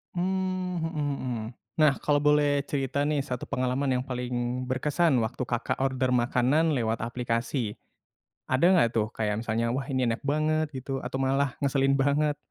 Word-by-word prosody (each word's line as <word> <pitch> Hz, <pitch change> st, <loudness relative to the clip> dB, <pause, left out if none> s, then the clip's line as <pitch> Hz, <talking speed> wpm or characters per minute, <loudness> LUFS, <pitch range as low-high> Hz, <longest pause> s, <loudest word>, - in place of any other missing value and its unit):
Mmm, 185 Hz, 0 st, -1 dB
mhm 150 Hz, -3 st, -2 dB
mhm. 120 Hz, -4 st, -3 dB, 0.3 s
Nah, 155 Hz, -2 st, +5 dB
kalau 145 Hz, -1 st, +2 dB
boleh 145 Hz, -1 st, +3 dB
cerita, 140 Hz, 0 st, -1 dB
nih, 150 Hz, -2 st, +1 dB
satu 125 Hz, -3 st, -5 dB
pengalaman 130 Hz, +2 st, -1 dB
yang -, -, -3 dB
paling 125 Hz, 0 st, -2 dB
berkesan 145 Hz, +5 st, +1 dB
waktu 120 Hz, +3 st, -2 dB
Kakak 120 Hz, -1 st, -2 dB
order 130 Hz, -1 st, 0 dB
makanan 125 Hz, +6 st, +2 dB
lewat 115 Hz, -3 st, -1 dB
aplikasi, 115 Hz, -1 st, -2 dB, 0.7 s
ada 130 Hz, +3 st, 0 dB
nggak, 165 Hz, -11 st, +5 dB
tuh, 110 Hz, -1 st, +2 dB
kayak 110 Hz, 0 st, -2 dB
misalnya 115 Hz, +1 st, -1 dB
wah 135 Hz, -, -1 dB
ini 130 Hz, -2 st, +1 dB
enak 115 Hz, -1 st, -1 dB
banget 155 Hz, +2 st, +1 dB
gitu 135 Hz, 0 st, -5 dB
atau 135 Hz, -, -4 dB
malah 135 Hz, +1 st, +1 dB
ngeselin 135 Hz, -1 st, +2 dB
banget? 145 Hz, +2 st, +2 dB
135 Hz, 160 wpm, -27 LUFS, 125-150 Hz, 0.7 s, Nah